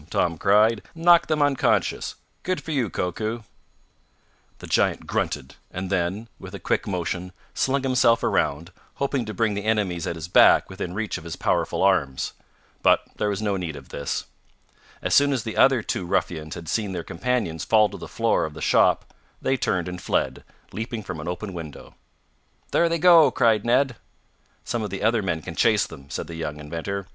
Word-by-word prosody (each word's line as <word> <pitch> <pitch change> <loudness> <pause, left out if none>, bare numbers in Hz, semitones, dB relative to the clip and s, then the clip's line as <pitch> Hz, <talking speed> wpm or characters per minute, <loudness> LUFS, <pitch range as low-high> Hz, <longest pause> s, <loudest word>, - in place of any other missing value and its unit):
Tom 85 -1 +1
cried. 105 +2 +4
"Knocked 170 +1 +5
them 155 -2 +2
unconscious. 145 -2 +1 0.3
Good 185 0 -1
for 160 - -7
you, 130 -8 0
Koku!" 110 +7 -3 1.1
The - - -10
giant - - +1
grunted, 65 +1 -2 0.2
and 90 +1 -5
then, 95 +4 -1
with - - -9
a - - -7
quick - - -1
motion, 90 -1 -3 0.2
slung 135 0 0
himself 125 -3 +3
around, 85 +5 0 0.2
hoping 140 -3 -1
to 110 - -5
bring 110 +1 +1
the 100 0 -3
enemies 100 -6 0
at 85 - -2
his 80 0 -6
back 90 - +5
within 90 -1 -5
reach 110 0 -2
of - - -14
his 85 0 -6
powerful - - 0
arms. 80 -9 +1 0.5
But - - +4
there 105 - 0
was 100 +1 -2
no 100 -2 0
need 85 -5 -4
of 70 -2 -11
this. 70 - -3 0.8
As - - 0
soon 145 0 +5
as 125 -5 -1
the 110 - -5
other 130 -4 +4
two 90 - -3
ruffians 80 -3 -2
had 85 -2 -9
seen 105 +2 -1
their 85 -2 -4
companions 85 -5 -2
fall 110 -1 +4
to - - -8
the - - -8
floor - - +1
of 80 -1 -7
the - - -8
shop - - +2 0.3
they 135 - +1
turned 90 -8 -1
and 90 0 -6
fled, - - -1 0.3
leaping 110 0 -5
from 90 -5 -6
an 75 - -6
open 95 +3 -4
window. 80 -4 -9 0.8
"There 170 - +3
they 170 - +1
go!" 165 -3 +7
cried 115 -4 +2
Ned. 125 +1 +2 0.7
"Some 120 - -2
of 105 - -3
the 95 +1 -5
other 110 0 +3
men 80 -5 -2
can 85 - -6
chase 105 +3 +3
them," 70 0 -12
said - - -4
the 85 - -9
young 75 -2 -5
inventor. 85 +6 -4
100 Hz, 190 wpm, -24 LUFS, 85-120 Hz, 1.1 s, go